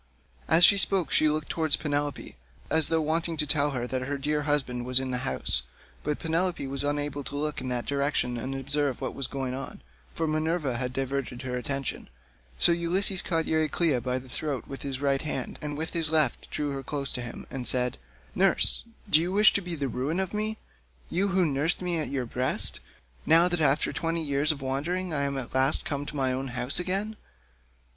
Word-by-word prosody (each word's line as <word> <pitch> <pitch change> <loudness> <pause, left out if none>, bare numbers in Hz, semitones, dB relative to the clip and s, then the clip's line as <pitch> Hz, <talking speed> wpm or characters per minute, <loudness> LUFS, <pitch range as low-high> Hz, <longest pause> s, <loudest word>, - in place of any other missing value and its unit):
As 165 +2 +8
she 200 - +7
spoke 185 -7 +1
she 155 - +4
looked 155 0 -2
towards 160 -2 +2
Penelope, 145 -1 -3 0.4
as 160 -2 +5
though 165 -1 +1
wanting 165 +1 -1
to 150 - +3
tell 145 0 +3
her 125 -4 -3
that 130 +1 -3
her 140 +2 -3
dear 150 +2 -1
husband 130 -4 0
was 125 +1 +4
in 130 -1 -3
the 125 - -1
house, 130 - 0 0.4
but 150 -1 -1
Penelope 165 -1 -1
was 135 +1 -3
unable 145 0 -2
to 140 - -7
look 150 -1 -2
in 130 - -4
that 125 -1 -2
direction 140 -3 0
and 130 +3 -4
observe 140 0 -1
what - - -3
was 135 - -1
going 135 -2 -3
on, 135 - -6 0.3
for 165 - -1
Minerva 155 -3 0
had 125 0 -2
diverted 135 -1 -3
her 125 -1 -3
attention; 135 +1 -3 0.5
so - - +5
Ulysses 180 +3 +2
caught 165 -2 0
Euryclea 160 -3 +1
by 125 0 -1
the 130 0 -8
throat 140 +1 -3
with 135 - -7
his 135 -2 -4
right 140 -1 +1
hand 135 -4 -4
and 150 -1 -4
with 160 +1 -4
his 165 -2 +1
left 155 -5 +1
drew 145 -1 -2
her 135 -1 -4
close 140 0 -2
to 125 - -2
him, 120 -1 -8
and 130 -3 -2
said, 125 0 +2 0.3
"Nurse, - - +3 0.2
do 160 -5 +5
you 175 +2 -2
wish 210 +2 +6
to 200 - +1
be 175 -2 -5
the 145 -3 -2
ruin 135 +8 -2
of 190 0 -2
me, 215 +1 -1 0.5
you 190 +4 +1
who 190 -2 +2
nursed 150 +3 0
me 175 -2 -1
at 155 - -2
your 135 -2 -2
own 120 - -9
breast, 125 +1 +1 0.5
now 170 +2 +7
that 175 -2 0
after 145 0 +3
twenty 165 0 -1
years 145 +1 +2
of 145 -3 -6
wandering 165 +7 -2
I 140 - 0
am 140 -1 -2
at 130 -3 -6
last 130 +3 +2
come 145 -4 -3
to 150 - -6
my 130 -2 +1
own 135 +1 -3
home 125 +1 -3
again? 195 +4 -1
145 Hz, 210 wpm, -27 LUFS, 135-165 Hz, 0.5 s, As